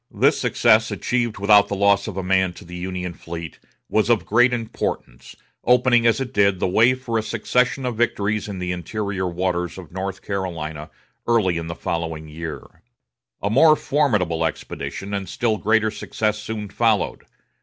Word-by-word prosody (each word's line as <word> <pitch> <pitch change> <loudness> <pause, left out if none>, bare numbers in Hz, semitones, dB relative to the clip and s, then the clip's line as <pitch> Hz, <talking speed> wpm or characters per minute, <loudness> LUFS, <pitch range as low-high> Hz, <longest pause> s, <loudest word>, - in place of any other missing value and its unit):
This - - +2
success, - - +3
achieved 120 -3 -1
without 100 0 +5
the 100 - -3
loss 100 +1 +3
of 100 -3 -6
a 95 - -2
man 95 -1 +2
to 100 - -13
the 90 +1 -9
Union 90 0 -4
fleet, 85 0 -8 0.3
was 110 +1 +1
of 115 -3 +2
great 120 +3 +4
importance, 110 - -4 0.3
opening, 125 -1 +4
as 115 - +3
it 135 -1 -4
did, 100 -3 +3
the - - +1
way 115 +7 +4
for 120 -3 -2
a - - 0
succession 125 +4 0
of 120 -3 -3
victories 105 -2 0
in 100 - -5
the 90 0 -3
interior 95 +1 -3
waters 90 0 -2
of 90 -4 -10
North 95 +1 -5
Carolina 85 -6 -4 0.4
early 110 -7 +2
in 80 - -6
the 85 - -5
following 80 -2 -4
year. 80 0 -8 0.6
A 100 - 0
more 155 +6 +6
formidable 105 - +1
expedition, 95 +4 -4
and 100 -3 -3
still 110 0 0
greater 110 0 +2
success 105 0 -2
soon 105 -1 -5
followed. 110 0 +1
100 Hz, 170 wpm, -22 LUFS, 90-115 Hz, 0.6 s, more